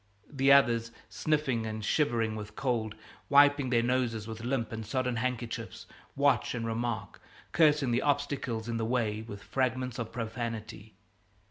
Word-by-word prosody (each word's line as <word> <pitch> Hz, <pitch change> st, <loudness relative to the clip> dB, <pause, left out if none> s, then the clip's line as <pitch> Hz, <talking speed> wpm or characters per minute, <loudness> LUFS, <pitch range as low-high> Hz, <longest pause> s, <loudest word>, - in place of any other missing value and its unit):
The 135 Hz, -1 st, +3 dB
others, 115 Hz, -4 st, +4 dB, 0.2 s
sniffing 140 Hz, -7 st, 0 dB
and 110 Hz, -1 st, -4 dB
shivering 115 Hz, -6 st, +1 dB
with 105 Hz, 0 st, -8 dB
cold, 115 Hz, -4 st, -1 dB, 0.3 s
wiping 145 Hz, -1 st, +5 dB
their 120 Hz, -2 st, +3 dB
noses 120 Hz, -3 st, 0 dB
with 110 Hz, 0 st, -7 dB
limp 120 Hz, -2 st, -1 dB
and 110 Hz, 0 st, -5 dB
sodden 125 Hz, +2 st, -1 dB
handkerchiefs, 120 Hz, -1 st, -4 dB, 0.3 s
watch -, -, +2 dB
and 115 Hz, -, -3 dB
remark, 115 Hz, 0 st, -3 dB, 0.3 s
cursing 150 Hz, -5 st, +4 dB
the 120 Hz, +2 st, +2 dB
obstacles 140 Hz, -6 st, -1 dB
in 115 Hz, -1 st, -2 dB
the 115 Hz, -, -1 dB
way 110 Hz, -3 st, 0 dB
with 105 Hz, -3 st, -9 dB
fragments 130 Hz, -1 st, -1 dB
of 115 Hz, -1 st, -4 dB
profanity. 115 Hz, -2 st, -5 dB
120 Hz, 145 wpm, -30 LUFS, 110-130 Hz, 0.3 s, wiping